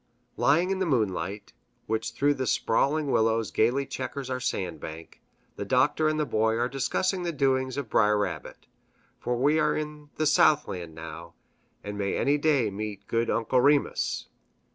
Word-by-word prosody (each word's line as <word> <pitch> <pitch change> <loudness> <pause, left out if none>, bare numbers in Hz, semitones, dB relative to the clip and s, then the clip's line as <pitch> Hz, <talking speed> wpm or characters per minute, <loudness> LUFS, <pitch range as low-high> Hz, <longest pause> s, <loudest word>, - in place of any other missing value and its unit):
Lying 170 +7 +3
in 190 - -1
the 190 - 0
moonlight, 100 - -1 0.3
which 110 0 -2
through 145 +1 +2
the 130 -2 -3
sprawling 140 +7 +1
willows 110 0 +1
gayly 125 +5 +2
checkers 130 0 -5
our 130 - -1
sand 90 -10 -3
bank, 80 +2 -9 0.4
the - - -3
Doctor 130 +7 +2
and 155 0 -1
the 150 - +1
Boy 110 -2 +1
are 120 +1 +1
discussing 180 +8 -1
the 175 -1 -2
doings 130 -3 0
of 140 -4 -3
Br'er 105 -1 +3
Rabbit 100 -3 -4 0.5
for 120 0 -2
we 145 +5 +3
are 150 -1 +2
in 150 -1 -6
the 155 - 0
Southland 90 - +2
now, 80 +1 -9 0.5
and 105 0 -6
may 100 -1 -1
any 145 +1 +2
day 140 -8 +2
meet 100 0 -6
good 115 +2 0
Uncle 115 +2 +2
Remus. 145 +2 +1
125 Hz, 165 wpm, -27 LUFS, 105-145 Hz, 0.5 s, Lying